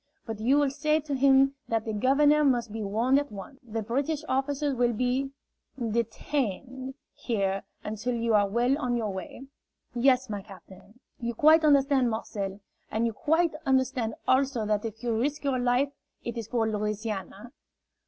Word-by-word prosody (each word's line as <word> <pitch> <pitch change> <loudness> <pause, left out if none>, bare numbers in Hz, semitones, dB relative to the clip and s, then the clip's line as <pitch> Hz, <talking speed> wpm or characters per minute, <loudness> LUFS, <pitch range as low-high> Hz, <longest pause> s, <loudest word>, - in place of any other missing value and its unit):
But 225 -2 -5
you 255 +6 +3
will 290 -2 +2
say 305 +2 +1
to 295 -1 -5
him 270 0 +4
that 225 -1 -1
the 220 - -3
governor 290 +7 +4
must 240 -5 +2
be 225 - -4
warned 230 +7 +2
at 290 -3 -5
once. 205 +6 -9
The 225 -2 -4
British 280 +7 -1
officers 275 +2 0
will 245 -1 +1
be 250 +4 0 0.5
detained 255 +2 -2 0.2
here 195 -4 -1 0.2
until 220 +4 -3
you 230 -1 0
are 205 -1 +4
well 240 +5 +2
on 250 -4 0
your 215 -4 -2
way." 190 +7 -7 0.5
"Yes, 255 +1 +3
my 205 -2 -4
captain." 195 +4 -15 0.2
"You 235 -1 -3
quite 315 +5 +6
understand, 275 -3 +4
Marcel? 205 -3 -4 0.3
And 225 +2 0
you 230 - -1
quite 320 +8 +1
understand 260 -5 +1
also 260 -3 +2
that 210 +1 0
if 225 +1 -7
you 235 -1 0
risk 280 +7 -1
your 270 -3 0
life, 250 +3 +2 0.3
it 235 - -4
is 230 -3 -5
for 225 -1 0
Louisiana?" 210 +1 -4
245 Hz, 165 wpm, -28 LUFS, 220-275 Hz, 0.5 s, quite